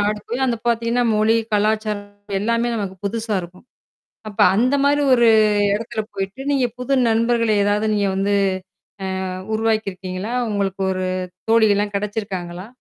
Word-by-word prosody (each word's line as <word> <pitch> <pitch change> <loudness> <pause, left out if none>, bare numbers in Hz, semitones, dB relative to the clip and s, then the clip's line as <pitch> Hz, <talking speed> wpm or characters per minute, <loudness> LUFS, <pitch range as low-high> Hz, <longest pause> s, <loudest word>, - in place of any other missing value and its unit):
நாடு 210 +1 0
போயி 245 +3 -3
அந்த 235 -3 -1
பாத்தீங்கன்னா, 235 +1 +1
மொழி, 220 +2 +3 0.2
கலாச்சாரம், 210 -1 0 0.3
எல்லாமே 230 +3 0
நமக்கு 195 -3 -4
புதுசா 220 +1 -2
இருக்கும். 180 +6 -13 0.6
அப்ப 205 - -6 0.2
அந்த 250 +5 +2
மாதிரி 290 +1 +3
ஒரு 235 -1 +4 0.5
எடத்துல 230 +1 -3
போயிட்டு, 195 +6 -4
நீங்கப் 250 -4 0
புது 250 +2 0 0.2
நண்பர்களை 230 0 +2
ஏதாவது 205 +2 +1
நீங்க 200 -1 +1
வந்து 200 +1 +1 0.9
அ - - -4 0.2
உருவாக்கி 220 -2 0
இருக்கீங்களா? 185 +4 -5 0.2
உங்களுக்கு 195 -1 -1
ஒரு 185 0 -2 0.5
தோழி 220 -2 +5
எல்லாம் 205 0 -1
கிடைச்சுருக்காங்களா? 195 -3 -5
215 Hz, 140 wpm, -21 LUFS, 200-230 Hz, 0.9 s, தோழி